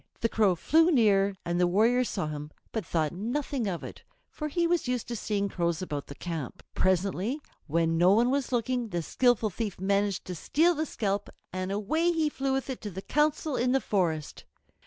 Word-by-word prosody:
The 230 - +2
Crow 205 -5 +3
flew 320 - +4
near, 200 - +4
and 175 +1 0
the 180 - +4
warrior 225 +7 +3
saw 195 -7 -2
him, 150 -1 -5 0.2
but 220 - -2
thought 160 -2 0
nothing 240 +5 -2
of 175 -4 -3
it, - - -8 0.3
for 300 - -4
he 340 +3 0
was 340 -5 +1
used 250 -2 -1
to 240 - -2
seeing 205 -2 -1
crows 170 -3 -1
about 145 -5 -4
the 140 - -9
camp. 160 -7 -5
Presently 190 - +1 0.3
when 165 +1 +1
no 180 +2 +6
one 235 +5 +4
was 275 -2 -1
looking 245 0 0
the 175 -5 -3
skillful 235 - +2
thief 210 -2 -4
managed 200 0 0
to 185 - -5
steal 320 - +2
the 315 0 -2
scalp, 205 -2 -2 0.2
and 185 +1 -3
away 315 - +1
he 320 -2 +1
flew 270 -2 -2
with 270 0 -1
it 260 -2 -5
to 210 - -5
the 190 0 -7
Council 300 0 +1
in 250 +1 +1
the 270 - +4
forest. 170 - -1
210 Hz, 200 wpm, -28 LUFS, 180-260 Hz, 0.3 s, no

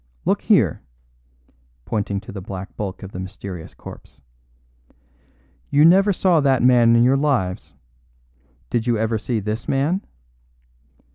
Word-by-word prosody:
Look - - +1
here!" - - +2 1.0
(pointing 100 -2 -2
to - - -11
the 95 - -7
black 95 0 -8
bulk 100 -2 -5
of 95 - -8
the 90 - -7
mysterious 95 -2 -8
corpse) - - -13 1.5
"you 145 +2 +4
never 195 +4 +5
saw 180 -3 +2
that 135 -4 +2
man 120 -2 +5
in 115 - +5
your 130 +2 +3
lives. 95 - -1 1.0
Did 120 0 -1
you 120 -2 +2
ever 110 0 -1
see 115 +1 -2
this 105 +2 -4
man?" 150 +8 0
115 Hz, 135 wpm, -21 LUFS, 100-135 Hz, 1.5 s, never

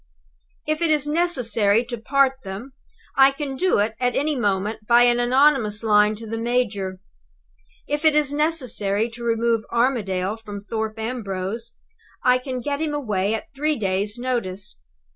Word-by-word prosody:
If 310 +2 -1
it 335 - +2
is 300 -2 +2
necessary 245 -9 +2
to 240 0 -4
part 270 +3 +3
them, 200 +8 -7 0.4
I 270 0 +7
can 275 -1 -5
do 370 +6 +2
it 210 +2 +1
at 250 -1 0
any 300 +1 0
moment 210 -1 -1
by 240 0 +6
an 240 0 +4
anonymous 245 -4 +3
line 210 -1 +4
to 225 +2 -9
the 225 +1 -4
major. 215 -6 -1 0.9
If 295 +1 -2
it 315 -1 +5
is 295 -2 +2
necessary 250 -9 0
to 235 +1 -10
remove 230 -1 +1
Armadale 215 -5 0
from 210 -2 -8
Thorpe 220 +1 -4
Ambrose, 225 -1 -4 0.5
I 250 0 +4
can 255 -1 -5
get 285 +4 -2
him 305 -2 -1
away 210 -6 -1
at 220 - -8
three 300 +2 0
days' 200 +1 -1
notice. 200 - -3
235 Hz, 160 wpm, -23 LUFS, 210-270 Hz, 0.9 s, I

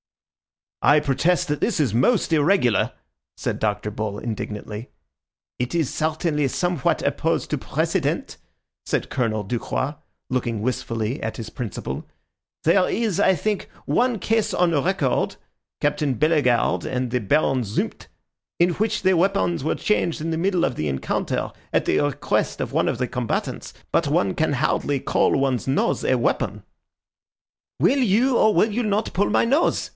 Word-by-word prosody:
"I 145 +1 +5
protest 165 +6 +1
that 150 - -1
this 215 -7 +1
is 135 -9 +1
most 165 - +2
irregular," 150 - +3 0.4
said - - -3
Dr. 105 0 -1
Bull 105 -1 -3
indignantly. 105 0 -5 0.7
"It 125 +5 -2
is 160 -6 0
certainly 155 -2 0
somewhat 175 +1 0
opposed - - 0
to - - 0
precedent," - - -1 0.5
said - - -1
Colonel 110 -4 0
Ducroix, 125 +6 -2 0.4
looking 120 -4 -1
wistfully 115 0 -2
at 110 - -4
his 110 -2 -6
principal. 115 -7 -5 0.6
"There 180 +3 +4
is, 215 -5 0
I 190 -2 +4
think, 210 +2 -2 0.2
one 245 -1 +2
case 220 +3 0
on 180 -1 +3
record 170 -9 0 0.5
(Captain 145 -2 +1
Bellegarde 145 -4 +2
and 125 -1 -2
the 125 - +1
Baron 135 +3 +2
Zumpt) 105 -2 -3 0.5
in 175 +1 +4
which 210 +3 -1
the 190 0 +4
weapons 175 -3 +1
were 155 - 0
changed 190 -5 0
in 165 +2 -3
the - - 0
middle 180 0 +1
of - - -1
the 75 - -1
encounter 70 -2 -2 0.2
at - - +1
the - - +2
request 145 -2 0
of - - -3
one - - +2
of - - 0
the - - -1
combatants. - - -3 0.2
But - - +2
one 95 -1 +1
can 160 -2 0
hardly 140 +1 0
call - - +2
one's 135 -4 0
nose 205 +13 +1
a - - +2
weapon." - - -1 1.2
"Will 280 - +3
you 245 +2 +3
or 215 - +5
will 220 - +3
you 235 +4 0
not 210 -1 -1
pull 200 +3 +1
my - - +3
nose?" 280 +8 +1
150 Hz, 155 wpm, -23 LUFS, 125-190 Hz, 1.2 s, I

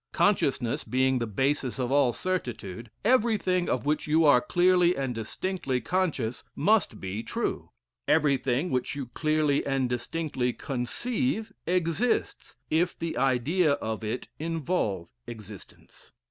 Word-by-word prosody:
Consciousness 135 - +1
being 130 0 +1
the 115 - -2
basis 130 +4 0
of 125 -1 -2
all 140 -3 +4
certitude, 120 - -4 0.2
everything 215 -7 +2
of 125 - -1
which 150 +1 0
you 160 +2 +4
are 145 -4 +6
clearly 180 +1 +3
and 135 -2 -1
distinctly 130 - -2
conscious 150 -10 -1
must 195 - +2
be 95 +3 -4
true: - - -3 0.4
everything 140 0 +2
which 130 +2 -1
you 140 -2 -4
clearly 155 -2 +1
and 135 -2 0
distinctly 125 0 -2
conceive, 225 - -2
exists, 180 +6 0 0.2
if 170 +3 +1
the 165 0 -3
idea 135 +6 +2
of 110 -5 -3
it 110 +3 -3
involve 155 - -1 0.2
existence." 105 -4 -12
140 Hz, 125 wpm, -27 LUFS, 125-175 Hz, 0.4 s, are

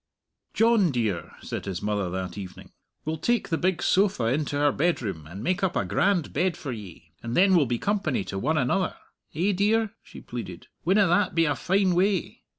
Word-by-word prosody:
"John 225 -5 +4
dear," 110 - -2
said - - -5
his 95 -3 -4
mother 105 -3 -1
that 95 0 -4
evening, 95 -3 -9 0.3
"we'll 155 0 -2
take 240 +6 0
the 165 - +1
big 185 -2 0
sofa 195 - +2
into 145 0 -1
our 145 0 +4
bedroom, 115 - -1
and 95 +6 -8
make 185 +5 0
up 185 -2 +1
a - - +1
grand 190 -5 +1
bed 180 -2 0
for 140 - -5
ye, 95 -7 -10
and 115 0 -3
then 190 +1 +5
we'll 160 -7 +4
be 120 0 0
company 185 - 0
to 95 - -5
one 155 +8 0
another. 155 +8 +1 0.4
Eh, 180 +6 +2
dear?" 210 +3 +1
she - - -12
pleaded. 110 -8 -7 0.2
"Winna 195 +4 +4
that 180 +1 +2
be 165 0 +4
a 145 - +2
fine 190 +2 +2
way? 190 +1 0
160 Hz, 195 wpm, -26 LUFS, -, 0.4 s, then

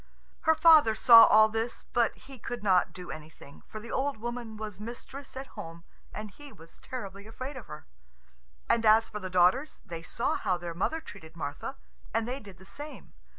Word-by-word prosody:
Her 320 - +6
father 310 -9 +6
saw 230 0 +9
all 215 0 +6
this, 225 +2 -3
but 235 -1 0
he 270 -2 -13
could 240 0 -6
not 185 -3 +3
do 180 -1 -9
anything, 155 -2 -12
for 215 - -8
the 230 +2 -9
old 275 -1 -1
woman 235 -1 -6
was 210 -2 -7
mistress 260 +5 -9
at 265 +1 -7
home, 165 +1 -9 0.3
and 215 -1 -7
he 290 +5 -13
was 165 -5 -17
terribly 200 -6 -8
afraid 255 +5 -7
of 255 - -9
her. 150 - -10 0.8
And 230 - +2
as 220 +1 +5
for 210 - -6
the 185 -2 -6
daughters, 185 - +2
they 165 -1 -7
saw 180 +7 -2
how 180 - 0
their 175 -1 -6
mother 315 - -1
treated 160 - -12
Martha, 145 -3 -5 0.4
and 225 0 +1
they 255 +3 -3
did 200 -6 -13
the 190 - -16
same. 290 +6 -10
220 Hz, 195 wpm, -29 LUFS, 185-250 Hz, 0.8 s, saw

